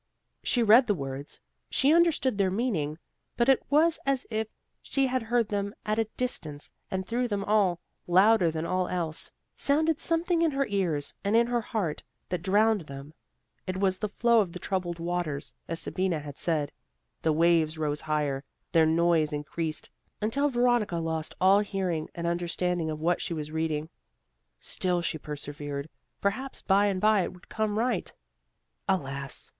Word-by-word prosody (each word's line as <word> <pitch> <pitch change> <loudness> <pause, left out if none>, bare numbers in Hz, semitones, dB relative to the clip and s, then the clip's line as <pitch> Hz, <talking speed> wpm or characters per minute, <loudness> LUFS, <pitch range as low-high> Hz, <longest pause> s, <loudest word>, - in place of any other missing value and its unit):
She 245 - +2
read 230 +4 +7
the 205 - +2
words, 135 -1 -6 0.3
she 280 +3 +3
understood 320 -9 +3
their 195 -1 +3
meaning; 185 - -1 0.4
but 235 - +3
it 270 -1 +5
was 315 +3 +4
as 275 -1 0
if 220 0 -1 0.3
she 275 -1 0
heard 240 -3 0
them 200 0 -2
at 215 +1 0
a 225 - +2
distance 155 - -3 0.2
and 190 0 -2
through 245 +4 0
them 205 -3 -2
all, 200 -4 +2 0.3
louder 190 +1 +5
than 160 0 -3
all 185 +1 0
else, 165 -3 -2 0.3
sounded 310 +2 +2
something 335 +1 +1
in 335 - +4
her 275 -1 0
ears 175 - -1
and 205 +2 +1
in 235 +1 +5
her 240 0 0
heart 205 -9 -2 0.3
that 180 -2 -2
drowned 205 -1 +2
them. 140 +2 -9 0.5
It 185 0 -2
was 190 -1 +1
the 210 - -2
flow 235 +2 +4
of 180 -5 -3
the - - -5
troubled 180 -2 -2
waters, 170 -4 -3
as 165 0 -3
Sabina 185 -3 -1
had 145 -1 -9
said. 155 -4 0 0.5
The 160 - +2
waves 160 0 +3
rose 150 -1 -1
higher; 150 -3 -1 0.3
their 160 -1 +5
noise 165 -1 +3
increased, 155 +2 -3 0.3
until 275 +7 +1
Veronica 240 -6 +2
lost 160 -1 -3
all 190 +2 +6
hearing 190 -6 -2
and 170 - -4
understanding 170 0 -1
of 155 -1 -4
what 170 +2 +1
she 170 - -2
was 155 -1 -5
reading. 160 -1 -1 0.7
Still 180 -2 -1
she 160 -2 -2
persevered; 145 0 -6 0.3
perhaps 255 +7 -2
bye 200 +1 +4
and 195 -2 0
bye 215 0 +4
it - - -3
would 180 - -17
come 215 -1 -1
right. 235 -3 0 0.8
Alas! 140 -7 0
185 Hz, 165 wpm, -28 LUFS, 160-225 Hz, 0.8 s, read